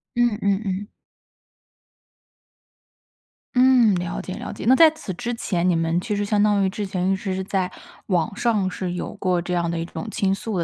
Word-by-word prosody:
嗯 240 -3 +2
嗯 200 0 +1
嗯。 195 +1 -3 2.7
嗯， 250 -4 +5
了 175 -1 -3
解 185 - -6
了 - - -6
解。 - - -7
那 260 - +7
在 320 +2 +8
此 305 -11 -7
之 240 +7 -4
前， 180 -5 0
你 175 - +3
们 165 +1 0
其 210 +2 -2
实 205 0 -1
相 205 0 +1
当 205 -1 +3
于 - - +1
之 205 +2 -4
前 190 -1 0
一 - - +2
直 190 0 -3
是 190 - -2
在 185 -1 -1 0.4
网 185 +2 0
上 210 -5 +1
是 180 -1 -4
有 180 - -4
过 185 -3 0
这 180 +1 -4
样 170 -1 0
的 170 - -2
一 165 - -2
种 220 - -7
倾 195 -2 0
诉 200 +1 -3
的， 170 - +1
195 Hz, 220 characters per minute, -23 LUFS, 180-210 Hz, 2.7 s, 在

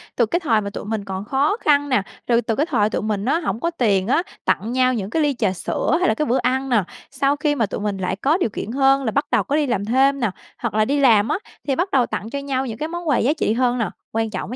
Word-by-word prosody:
Từ 235 - +3
cái 345 +11 0
thời 225 -10 +2
mà 200 - -4
tụi 200 - -7
mình 210 -2 -3
còn 190 +1 -5
khó 280 - +1
khăn 290 -1 +2
nè, 255 -6 +3 0.3
rồi 235 -1 +3
từ 225 -1 -2
cái 300 - +1
thời 215 -9 +1
tụi - - -2
mình 210 -1 -2
á 315 +6 +2
hổng 265 -8 -3
có 335 - -1
tiền 205 - +1
á, 295 +7 +3 0.2
tặng 225 +3 0
nhau 255 0 +2
những 205 -4 -3
cái 320 - 0
ly 290 -2 +2
trà 205 -5 0
sữa 190 - -1
hay 365 - +2
là - - +3
cái 300 +7 -1
bữa 250 +3 +1
ăn 260 +2 0
nè. 220 -6 +3 0.3
Sau 280 +1 +1
khi 295 -1 0
mà 230 -5 +1
tụi - - -5
mình 205 -2 -2
lại 185 0 -2
có 285 - +1
điều 295 - 0
kiện 210 +1 -5
hơn 270 +1 +3
là 225 - -1
bắt 285 +4 0
đầu - - +3
có 290 - -1
đi 305 -1 +2
làm 205 -5 -1
thêm 270 +4 +3
nè, 225 -6 0 0.3
hoặc 235 -3 -3
là 215 0 +2
đi 285 +3 0
làm 225 -5 +5
á, - - +1 0.3
thì 270 - +1
bắt 360 +3 -1
đầu 255 -3 +3
tặng 220 - -5
cho 280 - -4
nhau 270 -1 -2
những 225 -3 -5
cái 310 - -3
món 345 0 -6
quà 290 - +3
giá 280 +6 +2
trị 260 -8 0
hơn 250 0 +1
nè. 220 -6 -1 0.2
Quan 225 0 -1
trọng 190 +2 -5
á - - -4
250 Hz, 305 wpm, -21 LUFS, 215-285 Hz, 0.3 s, làm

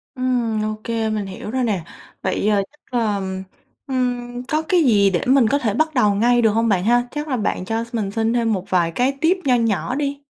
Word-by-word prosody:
Ừm, 245 -4 0
ô 215 0 -3
kê, 225 -1 -1
mình 215 -2 -2
hiểu 195 +2 -7
rồi 260 +1 0
nè. 205 -8 -1 0.4
Vậy, - - -1
ờ, 205 -2 +2
chắc 300 -3 -30
là, 215 -3 +1
ừm, 190 -1 -4 0.4
ừm, 245 -2 -2
có 310 +4 0
cái 340 +1 +2
gì 205 -7 +4
để 175 -3 0
mình 260 -2 +4
có 280 - +3
thể 220 -7 0
bắt 315 +7 +1
đầu 210 -7 +3
ngay 240 +3 +3
được 225 - +4
hông 225 +2 +1
bạn 185 -3 +2
ha? 245 +2 +3
Chắc 295 +1 -4
là 260 -4 -1
bạn 200 -4 -2
cho 225 +3 -1
mình 210 -4 -2
xin 225 +2 0
thêm 230 -2 +1
một 190 -2 -3
vài 175 -3 +2
cái 260 +9 0
tip 345 +4 +3
nho 255 -2 +4
nhỏ 230 +1 0
đi. 285 0 -2
230 Hz, 240 wpm, -21 LUFS, 210-255 Hz, 0.4 s, gì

